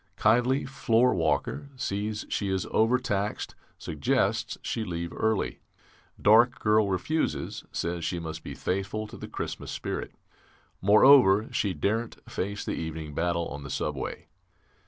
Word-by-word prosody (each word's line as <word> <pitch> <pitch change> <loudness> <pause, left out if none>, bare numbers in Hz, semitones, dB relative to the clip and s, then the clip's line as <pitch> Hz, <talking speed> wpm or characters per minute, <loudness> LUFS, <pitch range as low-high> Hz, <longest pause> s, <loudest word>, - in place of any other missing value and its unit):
Kindly 125 +5 +3
floorwalker, 130 +2 +1
sees 105 -1 -2
she 100 - -1
is 95 -1 0
overtaxed, 110 -3 +1 0.2
suggests 75 -3 0
she 115 - -2
leave 85 -3 -4
early. 110 -2 0 0.6
Dark 115 +4 +5
girl 105 -1 +3
refuses; 150 - -1
says 85 0 -2
she 80 +2 -1
must 80 -1 -6
be - - -7
faithful 100 +3 -2
to 105 - -10
the - - -8
Christmas - - -5
spirit; - - -4 0.7
moreover, 105 0 +6
she 100 -4 0
daren't 110 +9 -1
face 100 +2 -3
the - - -2
evening 80 -2 -5
battle 85 +2 0
on 70 - -7
the 70 - -8
subway. 70 -1 -3
100 Hz, 130 wpm, -28 LUFS, 85-115 Hz, 0.7 s, moreover